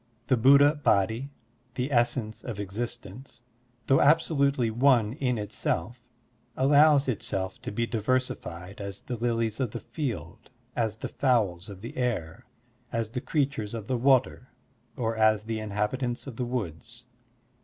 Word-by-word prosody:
The 130 - +3
Buddha 140 +4 +6
Body, 110 +7 +2 0.5
the 130 +3 -2
essence 120 -3 0
of 115 -5 -6
existence, 120 +3 -6 0.4
though 135 - +4
absolutely 140 -5 +3
one 120 -2 +3
in 125 -3 -1
itself, 105 +2 -3 0.6
allows 145 +1 +5
itself 95 -5 -3
to - - -5
be 115 +3 0
diver 115 +2 +1
sified 90 -7 -7
as 100 -1 -7
the 125 - -4
lilies 115 -2 -1
of 130 -3 0
the - - -4
field, 120 - -5 0.3
as 110 -3 0
the - - -5
fowls 105 -9 0
of 95 -2 -10
the 115 - -8
air, 110 -11 -2 0.4
as 115 -1 -2
the 125 - -3
creatures 135 -9 -1
of 110 -3 -5
the 130 - -1
water, 130 0 +2 0.5
or 115 -2 -1
as 110 -1 +3
the 110 0 -3
inhabitants 110 +4 -2
of 135 -4 -8
the 125 - -2
woods. 115 0 -5
120 Hz, 145 wpm, -27 LUFS, 105-130 Hz, 0.6 s, Buddha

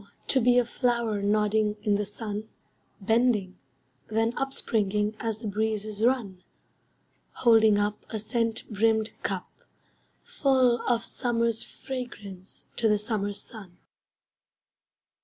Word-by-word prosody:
To 265 - +3
be 245 +1 +4
a 245 - +4
flower 235 -4 0
Nodding 210 +1 +2
in 210 -2 +2
the 205 0 0
sun, 210 0 -6 0.5
Bending, 215 -3 +1 0.5
then 225 +2 0
upspringing 210 -6 0
As 225 -2 -2
the 220 0 -6
breezes 215 0 -2
run; 225 -7 +1 0.9
Holding 220 -3 +5
up 205 +1 -1
A 220 - -3
scent 225 +1 -1
brimmed 220 +1 +2
cup, - - -3 0.8
Full 260 - +2
of 235 -2 +2
summer's 230 -2 0
fragrance 205 -8 -8
to 225 - +2
the 210 - +4
summer 205 -1 -2
sun. 200 -3 -11
220 Hz, 115 wpm, -27 LUFS, 210-235 Hz, 0.9 s, Holding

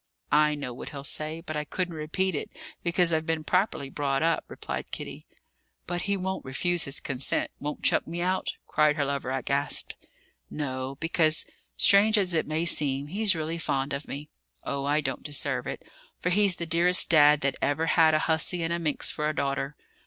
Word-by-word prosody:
"I 150 0 +4
know 135 -4 -5
what 120 - -8
he'll 140 -2 -8
say, 155 +3 -2
but 155 -2 -6
I 150 - -1
couldn't 180 +3 -3
repeat 165 +5 -1
it, 145 - -4 0.3
because 170 0 +2
I've 160 +1 0
been 160 -1 -1
properly 180 -6 0
brought 140 0 -1
up," 165 -1 +1
replied - - -6
Kitty. - - -7 0.6
"But 175 +3 -3
he 200 - +1
won't 190 0 -3
refuse 175 +6 0
his 140 - -1
consent, 135 -1 -2
won't 150 +1 -5
chuck - - +3
me 170 +2 -5
out?" 185 +2 -1
cried 150 0 +2
her 145 -3 0
lover, 140 -2 -3
aghast. 140 +2 +1 0.6
"No; 130 -2 -4
because, 165 -1 +3 0.3
strange 210 +2 +6
as 185 -3 +1
it 160 - 0
may 155 +2 -1
seem, 145 -3 -1
he's 200 +1 +4
really 160 +1 -3
fond 140 -3 -1
of 140 +1 -4
me. 145 +2 -6 0.4
Oh, 140 0 -3
I 145 +2 +2
don't - - -3
deserve 145 - -2
it; - - -6 0.3
for 180 - -2
he's 200 -1 +4
the 170 - -4
dearest 170 +2 +4
dad 150 -2 +6
that 140 -1 0
ever 145 +3 +1
had 160 -1 +4
a - - +3
hussy 165 +2 +2
and 165 +1 -1
a 170 - -1
minx 155 -4 -1
for 150 0 -2
a 155 - -3
daughter. 140 +1 -2
155 Hz, 195 wpm, -27 LUFS, 140-170 Hz, 0.6 s, strange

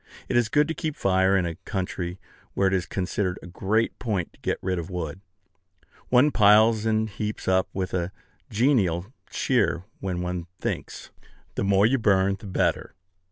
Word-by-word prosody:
It - - -2
is 120 -2 +3
good 150 +3 +3
to 165 - -2
keep 155 -3 -3
fire 95 0 +3
in 90 - +1
a 85 - -2
country 90 -2 -4 0.4
where 100 - +3
it 95 - +1
is 95 -2 0
considered 95 0 -2
a - - -12
great 100 +6 -1
point 100 -8 -2
to - - -24
get - - -1
rid 95 -1 0
of 85 - -6
wood. 90 -1 -5 0.9
One 130 +4 +5
piles 110 0 +5
and 110 0 +2
heaps 105 +1 -5
up 95 0 +2
with 95 -1 -3
a 90 0 -1 0.4
genial 105 - +1 0.2
cheer 115 - +1 0.2
when 90 -2 -3
one 90 -1 -3
thinks, - - -5 0.4
"The - - -2
more 100 +1 +4
you 130 +4 +3
burn, 100 -2 +3
the 100 - -10
better." 95 - -1
95 Hz, 175 wpm, -25 LUFS, 90-110 Hz, 0.9 s, One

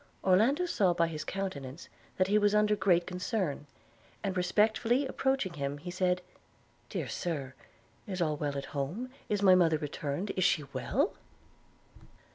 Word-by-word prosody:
Orlando 230 - +4
saw 195 - +2
by 170 - +3
his 155 -2 -4
countenance 155 -7 -5 0.3
that 185 - +4
he 205 +3 +3
was 205 0 +3
under 210 0 +4
great 180 -3 +3
concern; 180 - -2 0.6
and 195 -2 -1
respectfully 220 +8 +2
approaching 265 -7 0
him, 140 -2 -3
he 175 +5 -7
said, 180 0 0 0.7
'Dear - - -3
Sir, 145 -7 -3 0.5
is 190 -2 -4
all 155 -3 +1
well 145 -1 -2
at 140 - -4
home? 170 - -3 0.2
Is 205 -1 0
my 190 -2 +8
mother 165 -3 +4
returned? 150 +5 -3
Is 185 - 0
she 170 -4 +3
well?' 290 - 0
185 Hz, 150 wpm, -31 LUFS, 155-210 Hz, 0.7 s, my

